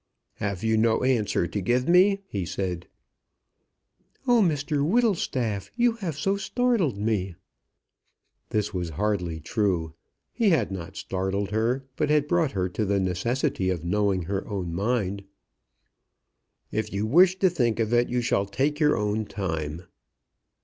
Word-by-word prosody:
"Have 100 -2 -3
you 110 0 +2
no 110 +1 +2
answer 115 -8 +1
to 100 +4 -3
give 125 +6 +1
me?" 195 +3 +4
he 100 - -3
said. 90 0 -4 1.4
"Oh, 245 -3 +4
Mr 150 -4 +1
Whittlestaff, 150 - 0
you 240 0 +3
have 170 -9 -4
so 195 +6 0
startled 200 - 0
me!" 100 -4 -1 1.1
This 105 0 -1
was 90 -2 -2
hardly 90 -6 -1
true. 85 -3 -1 0.4
He 230 -4 +2
had 160 - +2
not 90 -3 -6
startled 95 +1 -2
her, 120 +5 0
but 150 -1 0
had 150 -1 +3
brought 165 -5 +1
her 95 -2 0
to 100 +5 -2
the 100 -1 +1
necessity 95 +2 0
of 90 -4 -2
knowing 100 0 +1
her 95 +3 -3
own 95 -5 -4
mind. 100 0 -1 1.5
"If 110 0 -2
you 100 +2 -1
wish 180 +10 +5
to 190 - +4
think 120 -9 0
of 115 0 0
it, 120 0 +3
you 125 0 0
shall 100 -4 +1
take 145 +8 -1
your 150 -4 +3
own 105 +1 -1
time." 80 -5 -4
110 Hz, 150 wpm, -26 LUFS, 95-150 Hz, 1.5 s, wish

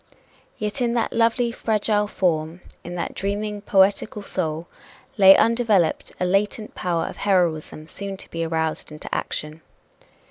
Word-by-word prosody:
Yet 210 +5 -3
in 235 -1 +1
that 230 - 0
lovely, 235 +1 +2
fragile 210 -2 0
form, 165 -3 -1 0.2
in 175 +1 -7
that 175 - -3
dreaming, 205 +1 -3
poetical 200 +1 +2
soul, 165 -4 -2 0.5
lay 195 -2 +8
undeveloped 225 -7 +2
a 180 - +1
latent 205 +3 0
power 170 -2 -1
of - - -7
heroism 170 -6 0
soon 195 +4 -6
to - - -10
be 165 0 -2
aroused 160 -1 -2
into 150 - -9
action. 150 +1 -3
195 Hz, 140 wpm, -23 LUFS, 165-210 Hz, 0.5 s, lay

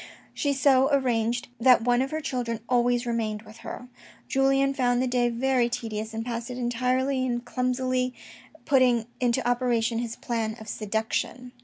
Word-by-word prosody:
She 285 - 0
so 270 0 +4
arranged 245 -3 +1
it - - -7
that 250 -3 +6
one 245 +1 +3
of 265 - -1
her 315 +2 -3
children 235 -5 -3
always 245 0 +2
remained 220 -3 -2
with 220 0 -14
her. 250 - -8 0.4
Julien 270 0 +2
found 245 -2 +1
the 255 - +1
day 245 -1 +1
very 245 0 +1
tedious, 220 -2 -4
and 225 0 -4
passed 235 0 -4
it 250 - -5
entirely 255 +2 0
in 240 -2 -1
clumsily 255 0 -1 0.5
putting 255 -5 +3
into 240 -1 +1
operation 240 -2 +1
his 235 -1 -4
plan 225 -2 -2
of 220 - -11
seduction. 220 +4 -3
245 Hz, 165 wpm, -26 LUFS, 230-255 Hz, 0.5 s, that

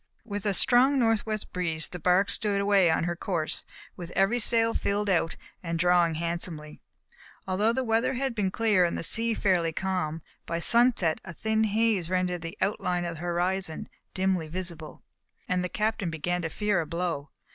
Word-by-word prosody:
With 205 -2 -4
a 200 - +2
strong 260 +6 +4
northwest 220 -3 0
breeze 165 -3 0
the 180 - -7
bark 180 +4 +3
stood 205 -3 0
away 200 -3 +4
on 160 - +1
her 175 +1 -1
course, 165 -3 -2 0.3
with 175 -2 -8
every 195 +6 +2
sail 230 0 +2
filled 205 0 0
out 165 -2 +1 0.3
and 165 -1 -3
drawing 175 -1 +3
handsomely. 165 -2 -5 0.7
Although 200 +4 +2
the 260 +2 -1
weather 230 +2 +1
had 265 0 -1
been 205 -4 0
clear 210 -2 +2
and 170 - 0
the - - -4
sea 225 +5 +1
fairly 175 -6 +1
calm, 165 -3 -2 0.2
by 170 - -2
sunset 230 -4 +3
a 170 - -8
thin 220 +5 0
haze 215 -4 +1
rendered 180 -1 0
the 165 0 -7
outline 180 -3 0
of 170 -1 -4
the - - -9
horizon 175 -1 -1 0.3
dimly 185 -4 0
visible, 170 -2 -7 0.4
and 180 0 0
the 180 - -2
Captain 215 -2 -1
began 175 +3 -2
to 160 - -3
fear 205 +1 0
a 160 - -6
blow. 170 -4 -3
185 Hz, 180 wpm, -27 LUFS, 170-215 Hz, 0.7 s, strong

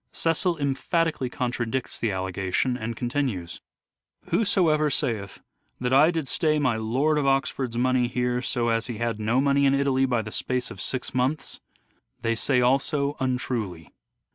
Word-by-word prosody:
Cecil 165 +1 +1
emphatically 145 0 0
contradicts 120 0 -3
the 115 - 0
allegation, 95 +6 -1
and 115 -1 -4
continues: 120 -9 -2 0.2
— - - -66
" - - -25
Whosoever 165 -8 +3
saith 110 -7 -2 0.4
that 125 +1 -1
I 145 +4 +6
did 165 -5 -2
stay 155 +2 +1
my 130 -6 +1
Lord 130 +8 +1
of 140 - 0
Oxford's 135 -3 0
money 125 0 +2
here 125 0 -1
so 120 -1 0
as 115 0 0
he 120 -3 -5
had 115 -1 -2
no 110 +4 +1
money 140 0 +3
in 135 0 +4
Italy 135 -1 +2
by 120 -3 0
the 105 - -7
space 125 +2 -2
of 95 - -7
six 130 +4 -2
months 130 +4 -1 0.6
they 115 0 0
say 125 +2 +1
also 140 +3 +1
untruly." 120 -10 -2
130 Hz, 165 wpm, -25 LUFS, 115-140 Hz, 0.6 s, I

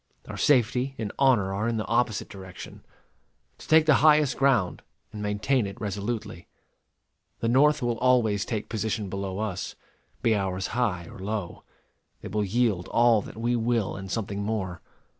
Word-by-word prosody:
Our - - -6
safety 130 0 +2
and 110 -3 -4
honor 120 -8 +3
are 105 +3 -1
in 115 -1 0
the 110 - -2
opposite 115 -2 0
direction 95 -2 -10 0.8
to - - -12
take 160 0 +5
the 155 - +5
highest 150 -3 +5
ground, 130 -10 +2 0.3
and 105 - -6
maintain 105 +3 0
it 100 - -9
resolutely. 105 -1 -4 0.9
The 115 - -1
North 145 +4 +4
will 120 -1 -1
always 120 -5 +3
take 110 -3 -4
position 110 -2 -2
below 95 0 -4
us, 100 -4 -4 0.5
be 115 - +4
ours 95 -2 -2
high 105 -9 0
or - - -12
low. 100 -2 -5 0.6
They - - -7
will 105 +2 0
yield 105 -3 0
all 115 -2 +4
that - - -11
we 120 +2 0
will 115 -3 0
and 95 0 -7
something 100 0 -3
more. 100 -4 -3
110 Hz, 160 wpm, -26 LUFS, 100-120 Hz, 0.9 s, take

